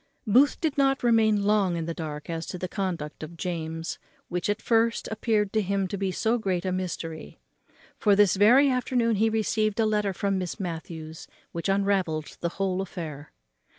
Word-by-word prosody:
Booth 250 +7 +4
did 310 -4 -1
not 270 -1 +2
long 240 - +4
remain 210 -4 +3
in 165 - -3
the 165 - -3
dark 150 -3 -6
as 165 -1 -4
to - - -5
the 185 - -3
conduct 175 -6 -4
of 165 +2 -8
James, 165 -2 -4 0.3
which, 180 +3 -2
at 205 +1 0
first, 230 0 +1
appeared 215 -2 0
to 220 - +3
him 195 0 0
to 190 - -4
be 195 -1 -1
so 225 +5 +1
great 185 -4 -1
a 185 - 0
mystery; 170 -3 -5 0.6
for 205 -2 +4
this 205 -2 +5
very 240 +8 +6
afternoon 245 -3 +1
he 225 +2 +3
received 215 -1 0
a 225 - +4
letter 210 -2 +1
from 195 +1 -1
Miss 180 +3 -4
Matthews 160 -3 -6 0.2
which 170 +3 -3
unravelled 195 -6 0
the 170 - -1
whole 190 -1 0
affair. 160 -6 -7
195 Hz, 185 wpm, -26 LUFS, 170-220 Hz, 0.6 s, very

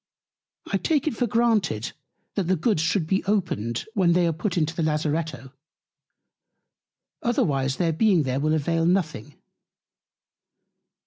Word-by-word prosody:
I - - 0
take 305 -5 0
it 300 - 0
for 245 - 0
granted, 210 - +1 0.4
that 195 - -1
the 185 - +3
Goods 180 0 +1
should 165 +1 +1
be 190 +4 0
opened, 145 - -1
when 185 -6 +3
they 175 0 +3
are 165 - +1
put 175 +3 -3
into 165 0 0
the - - -2
Lazaretto, 150 -4 -2 1.7
otherwise 135 - +1
their 170 -3 0
being 185 -1 +3
there 130 0 -1
will 155 +2 +1
avail 165 +2 +1
nothing. 170 - -1
165 Hz, 135 wpm, -25 LUFS, 150-195 Hz, 1.7 s, the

